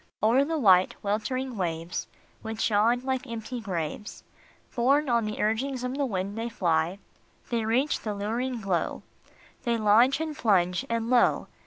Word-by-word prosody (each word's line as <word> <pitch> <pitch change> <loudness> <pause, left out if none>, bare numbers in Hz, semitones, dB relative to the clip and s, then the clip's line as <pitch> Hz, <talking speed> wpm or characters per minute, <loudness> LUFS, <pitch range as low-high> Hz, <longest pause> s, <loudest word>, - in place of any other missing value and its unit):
O 220 - +5
er 270 +2 +5
the 320 +3 -2
white, 190 -8 +4
weltering 230 +5 -2
waves, 170 -1 -3 0.3
Which 220 0 -2
yawn 225 +4 +3
like 260 0 -2
empty 235 +1 -5
graves, 185 0 -5 0.5
Borne 280 +4 +3
on 235 -2 +2
the 215 0 -4
urgings 250 +4 -1
of 250 +1 -3
the 280 -1 0
wind, 200 -2 -3
they 230 +1 -3
fly; 170 -3 0 0.5
They 230 -2 0
reach 255 +7 +1
the 210 -2 -4
luring 230 +4 -2
glow, 185 -5 -1 0.6
They 235 -2 0
launch 225 +6 +4
and 315 -1 -3
plunge, 185 -4 +2
and 230 +1 -1
lo 245 -1 +3
225 Hz, 160 wpm, -27 LUFS, 200-255 Hz, 0.6 s, O